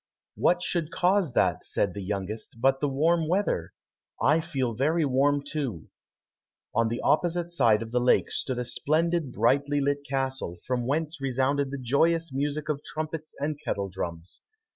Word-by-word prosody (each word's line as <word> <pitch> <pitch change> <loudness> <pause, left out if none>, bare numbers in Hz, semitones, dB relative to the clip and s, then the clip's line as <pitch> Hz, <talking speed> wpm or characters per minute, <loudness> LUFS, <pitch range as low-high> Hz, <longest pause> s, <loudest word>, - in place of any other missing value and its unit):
"What 175 0 +2
should 170 -4 -1
cause 180 -5 +2
that," 90 -7 +2
said 100 - 0
the 100 - -5
youngest, 105 +4 -4
"but 135 +2 +3
the 145 - 0
warm 160 +4 +2
weather? 180 - 0 0.5
I 150 +4 +3
feel 135 -7 -2
very 155 +7 +1
warm 140 +2 +2
too." 140 - -4 0.8
On 115 0 +2
the 120 +1 -3
opposite 175 +2 +1
side 115 -9 +3
of 115 - -10
the 125 - +2
lake 125 - +3
stood 130 -2 -1
a 125 - -2
splendid, 160 +4 0
brightly 140 +6 +2
lit 140 0 +1
castle, 135 -9 -2
from 125 -1 -1
whence 155 +2 -1
resounded 135 +1 +1
the 140 - -4
joyous 160 +5 +1
music 145 +2 -2
of 150 -2 -2
trumpets 155 0 -5
and 145 +1 -2
kettle 100 -1 -2
drums. 85 -2 -6
140 Hz, 165 wpm, -27 LUFS, 120-155 Hz, 0.8 s, but